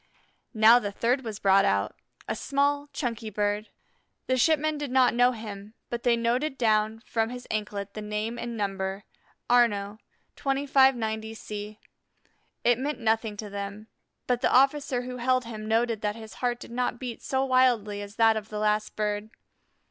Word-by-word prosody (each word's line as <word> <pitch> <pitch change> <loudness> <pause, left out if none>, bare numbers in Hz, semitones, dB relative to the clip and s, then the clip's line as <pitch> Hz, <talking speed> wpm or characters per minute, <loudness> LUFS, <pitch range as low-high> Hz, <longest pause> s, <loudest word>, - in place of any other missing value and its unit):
Now 220 +2 +7
the 205 -4 -4
third 245 +6 0
was 220 -3 -5
brought 195 -1 +4
out, 100 - +1 0.3
a - - -2
small, 285 +4 0
chunky 230 -5 -3
bird. 210 +1 -1 0.6
The 255 - +1
shipmen 310 +3 +2
did 290 -2 -3
not 255 -1 +4
know 245 +1 +4
him, 215 -2 -8 0.2
but 240 -1 -3
they 235 -1 +3
noted 250 +5 0
down 220 -1 +1
from 225 -1 0
his 250 0 -8
anklet 205 -2 -3
his 215 - -6
name 210 +3 -3
and 235 -1 -5
number, 195 -1 -3 0.4
Arnaux, 215 -4 +2 0.4
2590 265 -6 +2
C. 210 0 -7 0.8
It 240 0 +3
meant 290 +3 -2
nothing 220 -2 0
to 210 0 -6
them. 200 +2 -6 0.4
But 245 -1 0
the - - +2
officer 270 -1 +3
who 250 0 -6
held 255 0 +1
him 215 -2 -7
noted 225 0 +1
that 210 0 -1
his 220 -1 -10
heart 245 -1 0
did - - -11
not 245 0 -1
beat 245 -2 -6
so 265 0 0
wildly 245 -6 +2
as 205 0 -9
that 225 -1 +5
of 215 0 -5
the 215 - -5
last 210 0 0
bird. 210 0 -2
225 Hz, 170 wpm, -27 LUFS, 210-250 Hz, 0.8 s, Now